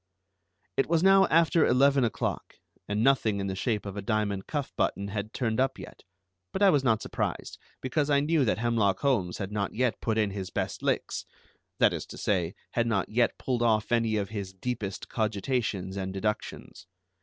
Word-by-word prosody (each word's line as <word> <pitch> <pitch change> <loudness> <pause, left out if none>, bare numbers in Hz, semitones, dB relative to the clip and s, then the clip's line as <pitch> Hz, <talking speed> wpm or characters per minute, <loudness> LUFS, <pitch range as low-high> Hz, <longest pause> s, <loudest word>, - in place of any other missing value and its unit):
It 135 - +2
was 165 0 +2
now 195 0 +6
after 165 -1 +4
eleven 135 +2 +4
o'clock, 115 - -2 0.3
and 105 +2 0
nothing 115 -6 +3
in 100 - -2
the 95 -1 -3
shape 105 +2 -1
of 100 -1 -6
a 100 - -4
diamond 100 -2 -1
cuff 145 -3 -3
button 100 0 -1
had 100 +2 -4
turned 115 -3 -1
up 135 +1 +1
yet, - - -11 0.5
but 195 - 0
I 195 - +7
was 145 -3 +2
not 115 -4 +2
surprised, - - -3 0.2
because 140 +3 0
I 140 -1 +4
knew 150 +1 +2
that 115 - +1
Hemlock 115 -4 +1
Holmes 115 -11 +1
had 100 0 -5
not 105 -2 -2
yet 125 0 0
put 110 -1 0
in 105 -2 +1
his 95 -2 -5
best - - -3
licks, - - -1 0.5
that - - +4
is - - -5
to - - -10
say, 90 -4 0 0.2
had 120 -1 0
not 100 -5 0
yet 120 +2 +1
pulled 125 -2 -2
off 110 -2 +2
any 115 -2 +2
of 100 -2 -2
his 100 -3 -5
deepest 100 -1 -4
cogitations 105 -3 -1
and 95 -1 -3
deductions. 105 -2 -4
110 Hz, 190 wpm, -28 LUFS, 100-130 Hz, 0.5 s, I